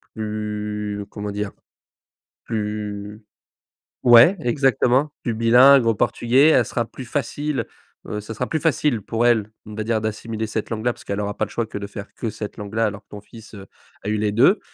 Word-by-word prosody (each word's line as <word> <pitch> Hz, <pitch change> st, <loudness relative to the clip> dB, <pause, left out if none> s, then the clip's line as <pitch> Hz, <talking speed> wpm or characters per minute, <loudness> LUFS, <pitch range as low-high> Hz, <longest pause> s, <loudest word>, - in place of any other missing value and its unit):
plus 105 Hz, -1 st, -4 dB
comment 105 Hz, 0 st, -5 dB
dire? 105 Hz, 0 st, -3 dB, 0.9 s
Plus 105 Hz, -1 st, -4 dB, 0.8 s
ouais, 120 Hz, +11 st, +7 dB
exactement, 135 Hz, +1 st, +2 dB
plus 120 Hz, -, -1 dB
bilingue 120 Hz, +4 st, +6 dB
au 115 Hz, -2 st, +2 dB
portugais, 130 Hz, +9 st, +3 dB
elle 125 Hz, -7 st, +4 dB
sera 120 Hz, 0 st, -2 dB
plus 130 Hz, -, -10 dB
facile, 145 Hz, +1 st, -2 dB, 0.4 s
heu, 105 Hz, -, -4 dB
ce 105 Hz, +2 st, -7 dB
sera 125 Hz, +3 st, -3 dB
plus 160 Hz, -, -1 dB
facile 140 Hz, -6 st, +1 dB
pour 115 Hz, +3 st, -1 dB
elle, 110 Hz, -3 st, +2 dB
on 105 Hz, -, -9 dB
va 110 Hz, -, -3 dB
dire, 110 Hz, 0 st, 0 dB
d'assimiler 110 Hz, +1 st, -4 dB
cette 110 Hz, 0 st, -4 dB
langue 110 Hz, 0 st, -4 dB
là, 120 Hz, -, +2 dB
parce -, -, -16 dB
qu'elle 100 Hz, 0 st, -3 dB
aura 105 Hz, -1 st, -3 dB
pas -, -, 0 dB
le -, -, -14 dB
choix 115 Hz, -, -1 dB
que 110 Hz, -, -7 dB
de 100 Hz, 0 st, -5 dB
faire 100 Hz, 0 st, -9 dB
que 115 Hz, -, -3 dB
cette 105 Hz, 0 st, -7 dB
langue 105 Hz, 0 st, -7 dB
là, 115 Hz, 0 st, +2 dB
alors 105 Hz, -1 st, -3 dB
que -, -, -57 dB
ton 105 Hz, -, -9 dB
fils, 110 Hz, +2 st, -14 dB
heu, 95 Hz, -1 st, -10 dB, 0.4 s
a -, -, -6 dB
eu 110 Hz, -, +1 dB
les 105 Hz, 0 st, 0 dB
2. 130 Hz, -, +4 dB
110 Hz, 205 wpm, -22 LUFS, 105-120 Hz, 0.9 s, ouais